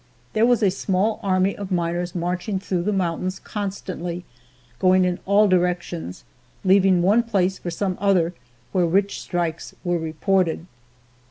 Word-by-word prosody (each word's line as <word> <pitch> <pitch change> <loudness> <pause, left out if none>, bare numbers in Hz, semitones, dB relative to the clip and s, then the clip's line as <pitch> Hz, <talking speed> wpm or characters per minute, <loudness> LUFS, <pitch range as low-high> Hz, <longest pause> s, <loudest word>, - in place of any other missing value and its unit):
There 220 +2 +4
was 245 -2 +3
a 195 - +4
small 195 +3 0
army 190 0 +1
of 200 -1 -7
miners 175 0 -1
marching 180 +3 -2
through 185 -2 -2
the 205 +4 0
mountains 185 0 -1
constantly, 185 -4 -5 0.5
going 185 0 +4
in 180 0 -1
all 205 +2 +5
directions, 175 - -1 0.4
leaving 190 -2 +4
one 205 +6 +4
place 195 -5 0
for 175 - -5
some 185 +2 -2
other 180 -4 +2 0.4
where 180 +1 +2
rich 195 +4 +1
strikes 170 -2 -3
were 175 -2 0
reported. 165 +1 0
185 Hz, 145 wpm, -23 LUFS, 175-195 Hz, 0.5 s, all